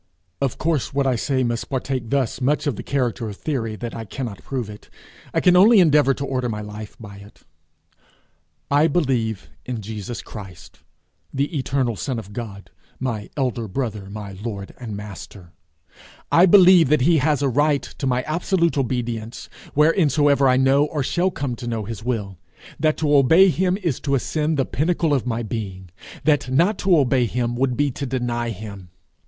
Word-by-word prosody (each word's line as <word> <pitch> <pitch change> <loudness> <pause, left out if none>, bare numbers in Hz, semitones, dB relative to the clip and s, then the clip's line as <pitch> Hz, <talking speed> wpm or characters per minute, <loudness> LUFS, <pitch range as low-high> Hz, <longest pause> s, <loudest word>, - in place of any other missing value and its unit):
Of 135 -3 -1
course 155 -5 -1
what 140 -1 +2
I 130 -2 +2
say 130 +2 0
must 120 -1 -2
partake 130 -3 -3
thus 135 -2 -1
much 145 +5 +1
of 145 -6 0
the - - -6
character 125 -4 -2
of 100 - -8
theory 115 -8 -3
that 115 +2 -6
I 115 - -5
cannot 115 -1 -6
prove 130 -5 -3
it; 105 0 -12 0.4
I - - +1
can 180 -1 +5
only 210 +4 +7
endeavour 150 -5 +4
to 140 - -4
order 130 -2 -2
my 105 -2 -3
life 105 0 -9
by 100 -3 -10
it. 100 +1 -16 1.3
I 145 +3 +5
believe 125 - -1
in 125 -2 -4
Jesus 110 +2 -6
Christ, 95 -4 -11 0.5
the 140 +5 -2
eternal 130 -3 0
Son 120 +7 -3
of 105 -2 -8
God, 105 -4 -7 0.3
my 115 -5 -3
elder 125 -4 -1
brother, 105 -2 -4
my 100 -1 -7
lord 100 0 -6
and 110 -5 -6
master; 100 -3 -10 0.8
I 175 +3 +6
believe 180 -5 +7
that 150 -2 +3
he 160 +4 +4
has 145 0 +1
a - - +3
right 145 +2 +2 0.2
to 135 - -1
my 125 0 +1
absolute 170 0 0
obedience 120 -3 -3 0.3
whereinsoever 145 -3 +4
I 130 - +4
know 135 +2 +4
or 150 -2 -2
shall 175 +7 +1
come 140 -8 -4
to 120 - -7
know 115 -3 -3
his 110 0 -7
will; 105 -7 -3 0.4
that 155 +1 +2
to 150 -2 +2
obey 160 +8 +6
him 180 +4 +1
is 170 -10 -2
to 140 -2 0
ascend 150 +3 -1
the 135 - +1
pinnacle 165 +1 0
of 130 -3 0
my 120 -1 -1
being; 95 -5 -6 0.3
that 145 -4 +2
not 170 +11 +2
to 185 -3 +4
obey 130 -3 +2
him 120 +1 -2
would 125 -1 0
be 145 -1 +1
to 140 +2 -5
deny 120 -2 -2
him. 100 -3 -8
130 Hz, 180 wpm, -22 LUFS, 110-145 Hz, 1.3 s, only